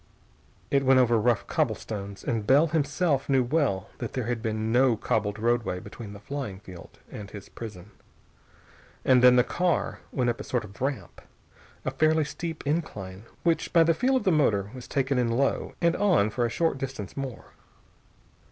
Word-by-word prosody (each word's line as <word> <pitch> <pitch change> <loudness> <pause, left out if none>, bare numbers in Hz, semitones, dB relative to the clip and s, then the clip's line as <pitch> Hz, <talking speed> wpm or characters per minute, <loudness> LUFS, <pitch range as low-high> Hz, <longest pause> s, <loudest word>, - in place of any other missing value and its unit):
It 140 -1 +3
went 130 0 +5
over 120 -3 +4
rough 120 0 +1
cobblestones, 100 -2 -3
and 110 -3 -2
Bell 140 +6 +6
himself 150 -2 0
knew 135 -2 +4
well 125 - 0
that 120 - -5
there 130 - -2
had 120 0 -2
been 110 -1 -2
no 125 -1 +4
cobbled 105 -1 -1
roadway 115 -4 0
between 105 +1 -9
the 100 - -10
flying 120 -6 -5
field 90 -4 -12
and 100 -1 -8
his 100 -1 -10
prison. 105 -3 -9 1.1
And 130 -1 +5
then 125 0 +8
the 125 - +5
car 175 +5 -1
went 125 -3 +1
up 115 - -8
a - - -5
sort 125 -3 -1
of 100 +2 -15
ramp, 135 0 -3 0.6
a - - 0
fairly 155 0 +2
steep 165 +1 -6
incline 105 - -3 0.2
which 165 -1 +1
by 165 -1 +7
the 165 0 +3
feel 255 +10 +1
of 260 - +1
the 190 - +3
motor 105 - +2
was 125 -2 -9
taken 135 -1 0
in 120 - +2
low, 135 +4 0
and 170 0 +3
on 175 - +3
for 120 +1 0
a - - -5
short 160 +2 0
distance 130 -8 -6
more. 135 -5 -6
125 Hz, 180 wpm, -27 LUFS, 110-145 Hz, 1.1 s, then